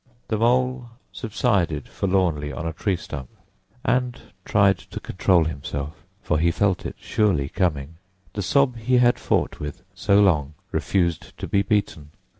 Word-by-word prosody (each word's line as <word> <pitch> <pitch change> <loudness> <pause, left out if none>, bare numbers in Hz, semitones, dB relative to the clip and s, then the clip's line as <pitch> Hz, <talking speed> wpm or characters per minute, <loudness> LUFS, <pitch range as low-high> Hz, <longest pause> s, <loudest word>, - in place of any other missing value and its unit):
The 110 - +1
Mole 125 +1 +1 0.2
subsided 100 - 0
forlornly 90 -7 0
on 75 +4 -5
a 80 - -2
tree 95 +4 0
stump 70 -6 -7 0.6
and 125 -1 +1 0.3
tried 100 -2 +4
to - - -8
control 95 -2 +2
himself, 75 0 -5 0.2
for 75 - +1
he 85 +2 +3
felt 95 +2 +1
it - - -8
surely 95 -11 +1
coming. 80 -4 -1 0.4
The 100 - -3
sob 130 +4 +2
he 125 +3 +2
had 120 0 +4
fought - - 0
with 75 0 -6
so 100 -1 +3
long 75 -7 +3 0.2
refused 85 -4 -1
to - - -5
be 100 - +2
beaten. 100 -7 -1
95 Hz, 150 wpm, -24 LUFS, 80-110 Hz, 0.6 s, tried